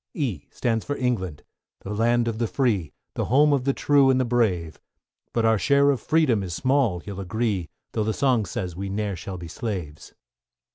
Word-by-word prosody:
=E= 110 - -3
stands 115 -3 -1
for 145 - -3
England, 95 - -2 0.4
the 100 - -5
land 120 +2 +2
of 115 -1 -2
the 115 - +1
free, 105 - 0 0.2
The - - -2
home 145 +4 +4
of 130 -3 0
the 135 - +2
true 140 -1 +4
and 130 -1 +3
the 130 - +2
brave; 95 -10 0 0.5
But 115 -1 +1
our 110 -2 +3
share 140 +3 +4
of 135 - -2
freedom 150 -10 +2
is 90 -3 -4
small, 130 -9 +1
you'll 100 -2 -6
agree, 100 -2 -2 0.2
Though 110 - -1
the 110 - +1
song 120 -4 +1
says 90 -1 -4
we 100 +2 -4
ne'er 100 0 -2
shall 95 +2 -6
be 85 -1 -8
slaves! 90 - -6
110 Hz, 195 wpm, -24 LUFS, 95-130 Hz, 0.5 s, home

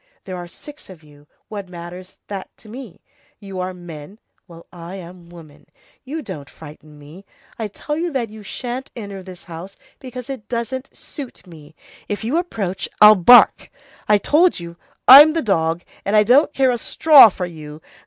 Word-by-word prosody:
There 185 - -7
are 175 -1 -8
six 295 - -15
of 175 -4 -14
you, 145 -1 -20 0.2
what 200 -3 -8
matters 180 +1 -11
that 195 -2 -7
to - - -19
me? 230 -4 -11 0.4
You 195 -2 -8
are 185 0 -3
men. 175 0 -11 0.3
Well, 170 -2 -15
I'm 175 0 -10
a - - -19
woman. 155 -4 -16 0.4
You 300 +4 -6
don't 155 -10 -9
frighten 150 -1 -14
me. 150 +6 -14 0.4
I 220 - -3
tell 295 +8 -6
you 340 +2 -3
that 250 -6 -3
you 215 0 -11
shan't 245 +5 -6
enter 200 -4 -8
this 185 -1 -12
house, 175 +3 -10 0.2
because 250 -2 -9
it 260 -6 -8
doesn't 250 +3 -5
suit 270 -8 -10
me. 155 -3 -15 0.3
If 205 +1 -4
you 250 +9 -1
approach, 195 - -4
I'll 210 0 +9
bark. 215 +5 +5 0.4
I 210 - +6
told 315 - +2
you, 170 0 -9 0.3
I'm 295 +4 +10
the 330 - -2
dog, 165 -5 -1 0.2
and 200 - -1
I 210 - +6
don't 260 +8 +4
care 265 -3 +2
a 240 - -3
straw 290 -1 +6
for 185 -1 -5
you. 155 -3 -10
195 Hz, 180 wpm, -19 LUFS, 170-250 Hz, 0.4 s, I'm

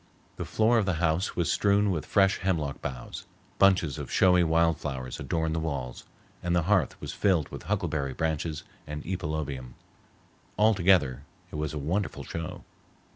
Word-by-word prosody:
The - - -4
floor 115 +2 +3
of 100 - 0
the 95 - +1
house 80 +3 0
was 85 -3 +1
strewn 100 0 +3
with 80 -4 -3
fresh 95 -1 +3
hemlock 80 -7 -1
boughs, 65 -4 -6 0.3
bunches 90 -8 +4
of - - -6
showy 90 -1 +5
wild 85 0 +3
flowers 65 -4 -5
adorned 80 -1 -1
the 80 - 0
walls, 70 -6 -4 0.4
and 90 0 0
the 85 - +2
hearth 95 -5 +1
was - - -6
filled 90 -8 +1
with - - -8
huckleberry 70 -4 -1
branches 80 -1 -2 0.2
and 75 0 -5
epilobium. 75 -8 -4 0.8
Altogether 95 - +4 0.3
it - - -7
was 75 0 -3
a - - -3
wonderful 85 +8 -2
show. 85 -1 -6
80 Hz, 160 wpm, -28 LUFS, 75-95 Hz, 0.8 s, showy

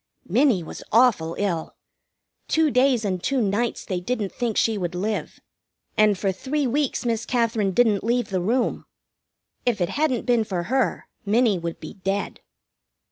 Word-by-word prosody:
Minnie 230 - +3
was - - -8
awful 215 -9 +3
ill. 180 -6 -2 0.7
Two 320 -2 +2
days 250 -3 +3
and 185 -3 -1
two 270 +6 0
nights 220 +2 -1
they 185 -2 -2
didn't 205 +1 -2
think 235 -3 -2
she 225 - +2
would 180 -3 -3
live, 210 +4 -3 0.6
and 215 -2 +4
for 195 +1 0
three 275 +9 -2
weeks 270 +1 0
Miss 230 -1 0
Katherine 230 -4 +1
didn't 215 -1 +3
leave 240 0 0
the 185 -2 0
room. 235 +7 0 0.8
If 240 -4 0
it 175 - 0
hadn't 285 -5 0
been 240 -3 +3
for 185 -5 -3
her 260 +8 0 0.2
Minnie 215 -2 +2
would 170 0 -5
be 155 - -8
dead. 195 +1 -2
220 Hz, 160 wpm, -24 LUFS, 190-245 Hz, 0.8 s, and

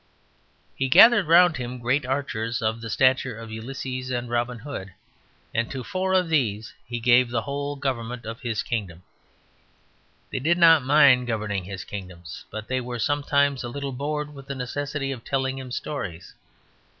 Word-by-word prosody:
He 135 0 -1
gathered 225 - +7
round 170 0 +6
him 125 0 -5
great 130 +3 0
archers 125 -3 -2
of 110 +1 -1
the 115 - -6
stature 130 0 +2
of 115 -1 -9
Ulysses 130 +3 -5
and 120 -1 -3
Robin 120 +1 -1
Hood, 110 -7 -7 0.6
and 115 +1 0
to 130 -2 -5
four 185 +6 -1
of 185 -2 +3
these 115 -9 0
he 120 0 -4
gave 120 +1 +4
the 120 -2 -1
whole 145 +1 -3
government 125 -3 -3
of 115 +5 -7
his 115 -5 -2
kingdom. 95 -7 -4 1.3
They - - -2
did 165 +6 +2
not 165 -3 +7
mind 135 -3 +5
governing 105 -4 -2
his 95 -1 -6
kingdom; 90 -4 -8 0.3
but 110 0 -7
they 130 0 -1
were 120 0 -5
sometimes 140 +1 +1
a 120 - -4
little 140 +2 -4
bored 150 +2 -3
with 135 -1 -12
the 140 - -4
necessity 135 +2 -3
of 125 -4 -7
telling 135 -1 -1
him 130 -1 -8
stories. 95 - -5
125 Hz, 170 wpm, -25 LUFS, 115-140 Hz, 1.3 s, gathered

